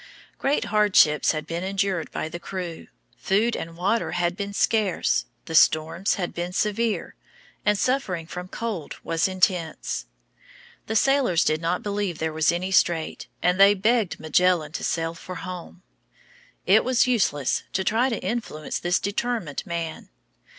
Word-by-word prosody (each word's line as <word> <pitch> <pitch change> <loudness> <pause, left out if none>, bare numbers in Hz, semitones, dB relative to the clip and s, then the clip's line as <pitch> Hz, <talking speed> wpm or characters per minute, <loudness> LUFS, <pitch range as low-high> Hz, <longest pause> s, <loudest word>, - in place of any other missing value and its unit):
Great 280 +2 +1
hardships 200 -8 +4
had 155 -2 -4
been 170 +2 -4
endured 190 -3 -1
by - - -4
the 175 +2 -7
crew. 175 -3 -6 0.3
Food 215 +5 +1
and 165 0 -6
water 200 +6 0
had 175 0 0
been 200 +1 -4
scarce, 200 -2 +1 0.2
the 165 - -7
storms 160 +4 +3
had 180 -3 -3
been 175 +1 -4
severe, 215 +3 -1 0.5
and 210 0 +2
suffering 195 -10 0
from 180 +2 -7
cold 200 -6 -5
was 165 +3 +1
intense. 180 - -1 0.8
The 220 - -2
sailors 260 - +3
did 155 +1 +1
not 170 +2 -1
believe 200 -4 -2
there 160 0 -2
was 160 0 +3
any 180 +2 -2
strait, 170 -4 +1 0.2
and 180 +1 +2
they 200 +1 +7
begged 215 0 +1
Magellan 160 0 +2
to - - -5
sail 165 0 -1
for 180 +2 -9
home. 180 0 -8 0.8
It - - +5
was 255 -1 +3
useless 190 - +1
to 190 - 0
try 230 +6 +2
to 230 - -1
influence 220 -10 -3
this 175 +1 +1
determined 205 - -2
man. 170 -2 -4
185 Hz, 150 wpm, -24 LUFS, 165-210 Hz, 0.8 s, they